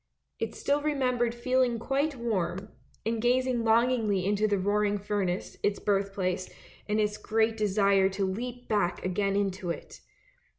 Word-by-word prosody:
It -, -, -3 dB
still 285 Hz, +1 st, 0 dB
remembered 250 Hz, -5 st, 0 dB
feeling 250 Hz, 0 st, +1 dB
quite 275 Hz, +5 st, 0 dB
warm, 205 Hz, -5 st, -2 dB, 0.4 s
and 225 Hz, 0 st, -1 dB
gazing 250 Hz, 0 st, +2 dB
longingly 225 Hz, -4 st, +2 dB
into 205 Hz, +2 st, +2 dB
the 205 Hz, -1 st, +1 dB
roaring 205 Hz, +2 st, +1 dB
furnace, 200 Hz, -3 st, -2 dB
its 205 Hz, 0 st, +1 dB
birth 195 Hz, -1 st, 0 dB
place; 185 Hz, -1 st, -1 dB, 0.4 s
and 210 Hz, +1 st, +1 dB
its 210 Hz, 0 st, 0 dB
great 220 Hz, +1 st, +1 dB
desire 200 Hz, -2 st, +3 dB
to 195 Hz, 0 st, -1 dB
leap 245 Hz, +6 st, -5 dB
back 195 Hz, -5 st, 0 dB
again 195 Hz, +2 st, 0 dB
into 190 Hz, -3 st, -1 dB
it. 170 Hz, -, -6 dB
210 Hz, 145 wpm, -28 LUFS, 195-240 Hz, 0.4 s, desire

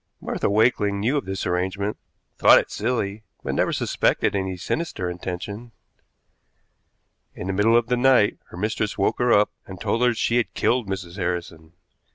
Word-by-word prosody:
Martha -, -, -2 dB
Wakeling 105 Hz, -1 st, +2 dB
knew 120 Hz, +8 st, +1 dB
of 145 Hz, -, -1 dB
this 95 Hz, 0 st, -4 dB
arrangement, 95 Hz, +3 st, -1 dB, 0.4 s
thought -, -, +8 dB
it -, -, 0 dB
silly, 110 Hz, -4 st, -2 dB, 0.2 s
but -, -, -2 dB
never -, -, +1 dB
suspected 100 Hz, -, +1 dB
any 95 Hz, -1 st, -2 dB
sinister 95 Hz, -, -3 dB
intention. 95 Hz, +6 st, -6 dB, 1.6 s
In -, -, -6 dB
the 95 Hz, -, -2 dB
middle 110 Hz, +4 st, +4 dB
of 120 Hz, -, +2 dB
the 125 Hz, +1 st, 0 dB
night 125 Hz, -4 st, +4 dB
her -, -, -11 dB
mistress 105 Hz, +1 st, -2 dB
woke 100 Hz, -, 0 dB
her 125 Hz, -1 st, +2 dB
up, 105 Hz, -1 st, +4 dB, 0.2 s
and 95 Hz, -2 st, -9 dB
told 115 Hz, -, -1 dB
her 125 Hz, -, +5 dB
that 120 Hz, -2 st, 0 dB
she 120 Hz, -, +1 dB
had 120 Hz, -, -1 dB
killed 120 Hz, -4 st, +1 dB
Mrs. 95 Hz, -1 st, -5 dB
Harrison. 85 Hz, -3 st, -4 dB
100 Hz, 175 wpm, -23 LUFS, 95-115 Hz, 1.6 s, thought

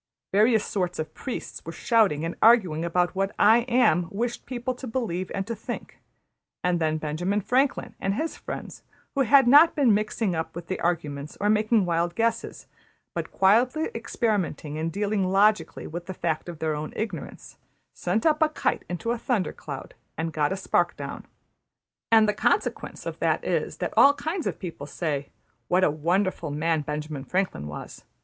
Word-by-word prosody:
Various 215 Hz, +2 st, +4 dB
sorts 180 Hz, -3 st, -2 dB
of 155 Hz, 0 st, -4 dB
priests 260 Hz, -, -6 dB
were 165 Hz, -, -6 dB
shouting 190 Hz, -5 st, +2 dB
and 165 Hz, -, -3 dB
arguing 190 Hz, -9 st, +5 dB
about 175 Hz, +1 st, +1 dB
what 195 Hz, +1 st, -2 dB
``I 230 Hz, +4 st, +5 dB
Am'' 180 Hz, -9 st, +3 dB
wished 235 Hz, +4 st, -3 dB
people 255 Hz, 0 st, -3 dB
to 255 Hz, +1 st, -8 dB
believe 205 Hz, -7 st, -2 dB
and 195 Hz, -, -2 dB
to 230 Hz, -, -3 dB
think; 215 Hz, -, -7 dB, 0.6 s
and 180 Hz, -1 st, +1 dB
then 155 Hz, -1 st, +1 dB
Benjamin 160 Hz, +7 st, -1 dB
Franklin 255 Hz, +6 st, 0 dB
and 195 Hz, +1 st, -1 dB
his 320 Hz, +5 st, -2 dB
friends, -, -, -7 dB, 0.3 s
who 275 Hz, -, +1 dB
had 270 Hz, +1 st, +6 dB
not 295 Hz, +6 st, +7 dB
been 265 Hz, -7 st, +4 dB
mixing 210 Hz, -1 st, 0 dB
up 160 Hz, -1 st, -3 dB
with 170 Hz, 0 st, -8 dB
the 185 Hz, -, -2 dB
argument 150 Hz, -4 st, -2 dB
or 205 Hz, +1 st, +2 dB
making 215 Hz, -1 st, +3 dB
wild 170 Hz, 0 st, 0 dB
guesses, 230 Hz, +1 st, -1 dB, 0.5 s
but -, -, -4 dB
quietly 250 Hz, -, +3 dB
experimenting 205 Hz, -, -2 dB
and 160 Hz, +1 st, -2 dB
dealing 200 Hz, 0 st, 0 dB
logically 210 Hz, +3 st, +2 dB
with 170 Hz, +2 st, -7 dB
the 190 Hz, -, -5 dB
fact 165 Hz, 0 st, -2 dB
of 170 Hz, -, -7 dB
their 155 Hz, 0 st, -1 dB
own 150 Hz, +1 st, -5 dB
ignorance, 205 Hz, -8 st, -6 dB, 0.4 s
sent 185 Hz, +5 st, -1 dB
up 310 Hz, -1 st, +3 dB
a 315 Hz, -, +5 dB
kite 305 Hz, -, -1 dB
into 200 Hz, +7 st, -2 dB
a 240 Hz, -, -2 dB
thundercloud, 230 Hz, -6 st, -3 dB, 0.3 s
and 160 Hz, 0 st, -2 dB
got 150 Hz, -2 st, +1 dB
a 190 Hz, -, -1 dB
spark 190 Hz, -, +1 dB
down; -, -, -7 dB, 0.8 s
and 220 Hz, -1 st, +6 dB
the 210 Hz, -, +2 dB
consequence -, -, -1 dB
of -, -, -5 dB
that -, -, +1 dB
is -, -, -1 dB
that -, -, -3 dB
all 280 Hz, +1 st, +7 dB
kinds 325 Hz, +2 st, -3 dB
of -, -, -3 dB
people 165 Hz, -6 st, -7 dB
say, 145 Hz, -2 st, -3 dB, 0.4 s
``What 180 Hz, +1 st, +3 dB
a 150 Hz, -, +4 dB
wonderful 170 Hz, +2 st, 0 dB
man 160 Hz, +2 st, 0 dB
Benjamin 150 Hz, -1 st, -5 dB
Franklin 180 Hz, -, -2 dB
was!'' 75 Hz, -, -8 dB
190 Hz, 175 wpm, -26 LUFS, 165-230 Hz, 0.8 s, not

